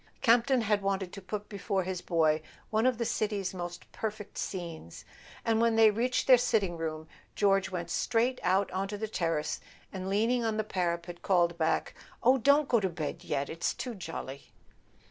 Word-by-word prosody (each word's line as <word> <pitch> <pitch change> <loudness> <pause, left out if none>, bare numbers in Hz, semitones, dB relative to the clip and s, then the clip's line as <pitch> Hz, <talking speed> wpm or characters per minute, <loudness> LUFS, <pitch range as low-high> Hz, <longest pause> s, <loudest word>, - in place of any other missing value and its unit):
Campton 245 +2 +4
had 210 -2 +1
wanted 195 -2 -1
to 195 - -7
put 205 +2 -5
be¬ 200 - -8
fore 195 -2 0
his 185 0 -4
boy 160 -3 +2 0.3
one 220 +3 +3
of 255 -3 +2
the 235 - -1
city's 205 -4 -1
most 175 -1 -7
perfect 215 -2 -5
scenes; 170 - -6 0.4
and 225 0 +2
when 230 -1 +3
they 220 -1 +7
reached 245 +4 0
their 255 -2 +7
sitting 210 -7 +1
room 160 -1 -4 0.3
George 195 -3 +3
went 170 -2 -4
straight 245 +5 +1
out 190 +2 +2
onto 195 +2 -2
the 220 +1 -3
terrace, 165 -7 -1 0.3
and 190 0 -4
leaning 230 +5 +2
on 220 -1 0
the 215 - +1
para¬ 175 -4 -1
pet, 175 0 -10
called 175 -3 +2
back: 160 -1 0 0.3
"Oh, 260 +2 +5
don't 285 +4 +4
go 235 - +4
to 190 -2 0
bed 155 -4 -5
yet—it's 140 +4 -2
too 250 -1 -4
jolly." 160 -8 -7
195 Hz, 185 wpm, -30 LUFS, 175-225 Hz, 0.4 s, they